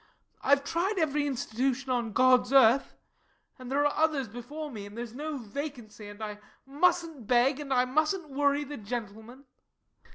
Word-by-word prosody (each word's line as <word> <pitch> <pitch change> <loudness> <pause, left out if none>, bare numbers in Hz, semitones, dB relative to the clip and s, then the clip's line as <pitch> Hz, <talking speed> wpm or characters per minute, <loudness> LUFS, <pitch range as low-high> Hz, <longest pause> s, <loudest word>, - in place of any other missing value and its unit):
I've 280 0 +3
tried 360 +8 -1
every 295 -3 +1
Institution 260 +1 -2
on 240 -3 -1
God's 255 +2 +4
earth 265 -1 +5 0.6
and 255 0 -8
there 285 +1 +2
are 290 - +1
others 305 -5 +1
before 285 +7 -7
me, 205 -4 -7
and 205 +2 -12
there 235 - -3
is 230 -2 -9
no 300 +3 -4
vacancy, 235 -3 -7
and 205 +1 -9
I 210 -1 -6 0.3
mustn't 310 - 0
beg, 255 +4 +3
and 285 -2 -7
I 250 -1 +3
mustn't 310 +4 0
worry 285 +1 +1
the 290 0 -7
gentlemen. 225 +3 -7
265 Hz, 165 wpm, -29 LUFS, 235-290 Hz, 0.6 s, earth